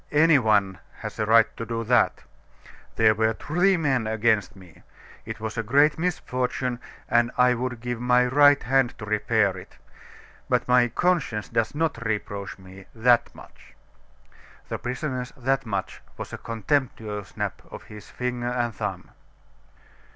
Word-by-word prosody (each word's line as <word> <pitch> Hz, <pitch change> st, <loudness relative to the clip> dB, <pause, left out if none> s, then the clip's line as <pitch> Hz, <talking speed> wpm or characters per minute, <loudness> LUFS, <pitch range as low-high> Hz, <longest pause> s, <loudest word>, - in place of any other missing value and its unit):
Any 155 Hz, 0 st, +5 dB
one 100 Hz, -5 st, +1 dB, 0.2 s
has -, -, -7 dB
a 110 Hz, -, 0 dB
right 115 Hz, 0 st, +6 dB
to -, -, -4 dB
do 115 Hz, 0 st, -3 dB
that. 120 Hz, +2 st, +2 dB, 0.7 s
There 110 Hz, -1 st, +5 dB
were 110 Hz, +1 st, +1 dB
three 180 Hz, -, +1 dB
men 135 Hz, -8 st, 0 dB
against 110 Hz, -2 st, +1 dB
me. 90 Hz, -4 st, -16 dB, 0.5 s
It 110 Hz, 0 st, -6 dB
was 110 Hz, +1 st, -4 dB
a -, -, +2 dB
great 140 Hz, +8 st, +3 dB
misfortune; 125 Hz, -7 st, -2 dB, 0.3 s
and 120 Hz, 0 st, +3 dB
I 125 Hz, 0 st, +5 dB
would 125 Hz, -1 st, -4 dB
give 120 Hz, -1 st, -4 dB
my 125 Hz, 0 st, +4 dB
right 145 Hz, +2 st, +5 dB
hand 130 Hz, 0 st, +1 dB
to 105 Hz, -, -7 dB
repair 105 Hz, -1 st, +1 dB
it; 90 Hz, -, -12 dB, 0.7 s
but -, -, +1 dB
my 125 Hz, -1 st, +4 dB
conscience 130 Hz, -8 st, 0 dB
does 115 Hz, +5 st, -1 dB
not 155 Hz, -7 st, -1 dB
reproach 100 Hz, -3 st, -4 dB
me 95 Hz, 0 st, -14 dB
that 120 Hz, +1 st, +3 dB
much!" -, -, -16 dB, 0.9 s
The -, -, -4 dB
prisoner's 125 Hz, 0 st, -4 dB
"that 130 Hz, 0 st, -1 dB
much," 100 Hz, -3 st, -4 dB, 0.2 s
was -, -, -7 dB
a -, -, -6 dB
contemptuous 110 Hz, -3 st, -2 dB
snap -, -, -5 dB
of -, -, -10 dB
his 105 Hz, -2 st, -12 dB
finger 125 Hz, -1 st, -3 dB
and 120 Hz, -2 st, -1 dB
thumb. -, -, -5 dB
120 Hz, 150 wpm, -25 LUFS, 110-130 Hz, 0.9 s, right